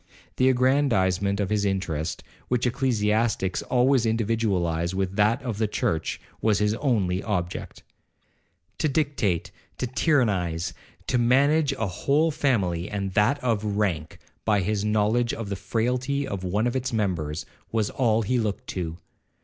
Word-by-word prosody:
The 130 0 +4
aggrandizement 110 -8 +2
of 100 -1 -1
his 105 -1 +1
interest, 80 -5 -2 0.2
which 125 0 0
ecclesiastics 110 -5 +1
always 125 0 +3
individualize 100 -7 0
with 95 0 -1
that 110 +5 +2
of 115 -5 -3
the 110 - +2
church, 80 -5 -1 0.2
was 110 -2 +3
his 105 0 +2
only 105 -8 0
object. 90 -5 -4 1.0
To 155 - +2
dictate, 135 - 0 0.3
to - - -1
tyrannize, 100 - +1 0.3
to 125 - +1
manage 140 +5 +3
a 110 - -2
whole 140 - +1
family, 100 - 0
and 100 -2 -3
that 105 +8 +3
of 115 -4 +1
rank, 85 -7 -1 0.3
by 105 -2 +2
his 105 +2 -1
knowledge 110 +3 +1
of 115 -3 -5
the 100 - -2
frailty 125 +7 -1
of 100 -6 -4
one 100 +5 0
of 120 - 0
its 130 0 -1
members, 85 -9 -1 0.3
was 110 -2 0
all 115 -3 +2
he 125 +4 +1
looked 105 -3 -2
to. 85 -3 -4
105 Hz, 145 wpm, -25 LUFS, 95-125 Hz, 1.0 s, The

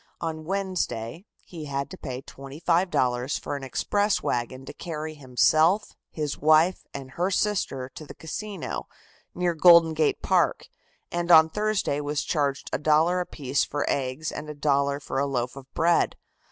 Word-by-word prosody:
On 160 -2 -4
Wednesday 185 - -3 0.2
he 165 -4 -8
had 140 -1 -3
to - - -6
pay 130 -6 -6
$25 135 -3 -1
for - - -4
an 140 - -6
express 205 +10 0
wagon 125 +2 -2
to - - -8
carry 155 -2 -5
himself, 155 - +2
his 150 -3 -4
wife 155 +4 +3
and 135 -1 -8
her 180 +6 -1
sister 185 -10 -1
to 155 - -10
the - - -10
Casino, 195 +3 -5 0.5
near 175 -1 +1
Golden 170 -1 +7
Gate 155 -1 0
Park, - - +1 0.4
and 175 0 -2
on 160 -2 +8
Thursday 210 -7 0
was 145 0 -2
charged 140 -4 -1
a - - 0
dollar 155 +4 +3
apiece 140 -6 -1
for 145 0 -2
eggs 135 +3 -2
and 150 - -7
a 150 - -6
dollar 140 -1 +1
for 135 -1 -3
a 140 - +1
loaf 125 -2 -2
of 135 -1 -12
bread. 170 +1 +2
155 Hz, 160 wpm, -26 LUFS, 140-175 Hz, 0.5 s, on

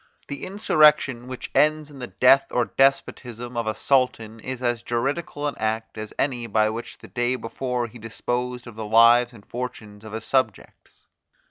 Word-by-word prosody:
The 140 - -6
insurrection, 150 - +3
which 130 -1 -7
ends 155 0 +2
in 140 - -12
the 125 - -5
death 135 +2 +4
or 120 -1 +1
despotism 125 -3 0
of 115 -1 -2
a 110 - -1
sultan, 115 -4 0
is 130 +2 -6
as 120 -2 0
juridical 140 +6 -2
an 145 - -2
act 110 +1 -2
as 110 -1 -6
any 125 -4 -1
by 110 0 +2
which 115 +2 -7
the - - -13
day 120 +1 0
before 125 +1 -3
he 120 +1 -11
disposed 125 +3 -3
of 120 - -10
the 110 -1 -5
lives 115 +3 +5
and 110 -4 -16
fortunes 110 -4 -7
of 110 -1 -10
his 110 0 -5
subjects. 130 -7 -2
120 Hz, 175 wpm, -24 LUFS, 115-130 Hz, -, lives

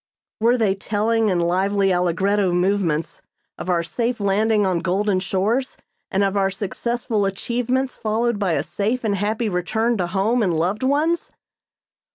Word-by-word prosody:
Were 235 +3 +3
they 215 -5 +2
telling 215 +3 0
in 180 -2 +1
lively 190 +3 +1
allegretto 180 +2 +1
movements 175 -4 0 0.4
of 185 - -5
our 170 -2 +2
safe 235 +7 -2
landing 205 +1 +2
on 185 -3 +1
golden 190 +2 0
shores, 205 +8 -1 0.3
and 195 +1 +1
of 195 0 0
our 195 -1 +2
successful 220 +3 -2
achievements 245 +6 -2
followed 225 0 0
by 190 -5 +1
a 145 -2 0
safe 220 +9 -2
and 215 -2 +1
happy 215 +4 -1
return 220 +5 0
to 175 - 0
home 205 +7 +1
and 180 -6 +1
loved 185 +6 0
ones? 300 +6 0
205 Hz, 155 wpm, -22 LUFS, 185-230 Hz, 0.4 s, Were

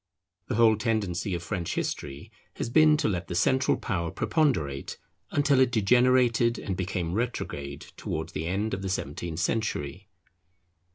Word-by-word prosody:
The - - -2
whole 110 -1 +5
tendency 105 -4 -1
of 85 - -5
French 85 -3 -3
history 70 0 -4 0.2
has 120 - -4
been 155 +2 +6
to 150 - +1
let 90 -4 -2
the 90 - -4
central 130 +9 +2
power 85 -3 -2
preponderate, 80 - 0 0.3
until 145 -2 +3
it 130 - +5
degenerated 120 +1 +3
and 95 - -3
became 90 -2 -2
retrograde 75 - -3 0.2
towards 80 0 -4
the 80 - -3
end 100 +5 -1
of 95 - -2
the 95 - -3
seventeenth 80 -1 -3
century. 95 -3 -2
100 Hz, 150 wpm, -27 LUFS, 85-120 Hz, 0.3 s, been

